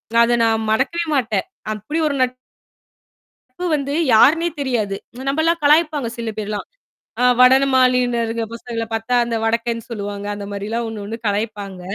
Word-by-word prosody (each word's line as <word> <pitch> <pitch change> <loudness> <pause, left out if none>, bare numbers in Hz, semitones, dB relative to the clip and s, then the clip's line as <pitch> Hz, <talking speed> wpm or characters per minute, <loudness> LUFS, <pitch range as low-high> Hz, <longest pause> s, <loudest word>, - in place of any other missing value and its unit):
நான், 235 - +7
அதை 240 0 +2
நான் 225 -1 +1
மறக்கவே 315 +9 0
மாட்டேன். 220 -6 0 0.3
அப்படி 215 +10 -4
ஒரு 280 - -2 1.1
நட்பு 305 +8 -8
வந்து, 280 0 -3 0.2
யாருன்னே 325 +9 +5
தெரியாது. 220 -7 -1 0.3
நம்பெல்லாம் 325 +3 +1
கலாய்ப்பாங்க 300 -5 +3
சில 230 -1 -3
பேர் 210 -1 -4
எல்லாம். 205 - -4 0.5
அ - - +3 0.2
வடமாநில 250 -3 +3
பசங்கள 230 -1 -5
பாத்தா, 225 +3 -1
அந்த 235 -1 -3
வடக்கன்னு 230 0 -1
சொல்லுவாங்க. 205 -2 -5
அந்த 205 0 -6
மாரி 200 0 -5
எல்லாம் 235 +1 -2
ஒண்ணொண்ணு 215 0 -6
கலாய்ப்பாங்க. 205 -2 -3
235 Hz, 140 wpm, -20 LUFS, 215-265 Hz, 1.1 s, நான்